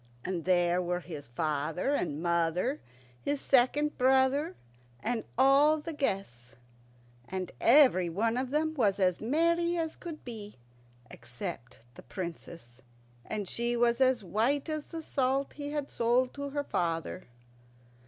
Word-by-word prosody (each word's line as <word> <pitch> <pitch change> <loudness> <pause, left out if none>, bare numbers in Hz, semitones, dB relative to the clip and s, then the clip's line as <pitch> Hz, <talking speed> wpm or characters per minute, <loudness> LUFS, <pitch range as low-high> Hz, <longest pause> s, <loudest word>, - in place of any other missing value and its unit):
And 180 -4 -3
there 175 -1 +3
were 180 0 -2
his 150 -5 -8
father 155 - -1
and 165 - -2
mother, 170 - 0 0.4
his 285 0 -1
second 280 +4 +2
brother, 265 +6 +3 0.4
and 230 - -2
all 275 +4 +5
the 325 +2 -6
guests. 190 - -3 0.7
And 185 -1 -4
everyone 225 - +4
of 255 +1 -1
them 310 +3 0
was 205 -9 +1
as 180 -2 +2
merry 335 +7 +1
as 320 -1 -2
could 330 -3 -9
be, 215 -4 -8 0.6
except 170 - -8
the - - -12
Princess, 165 -8 -8 0.5
and 210 -3 -3
she 240 +4 -1
was 235 +1 +2
as 255 -4 +3
white 235 - 0
as 310 -1 -3
the 325 -1 -7
salt 270 -1 0
he 290 -1 -6
had 295 -1 -3
sold 245 +2 +1
to 280 0 -5
her 285 +1 -2
father. 170 - -2
240 Hz, 135 wpm, -30 LUFS, 180-285 Hz, 0.7 s, all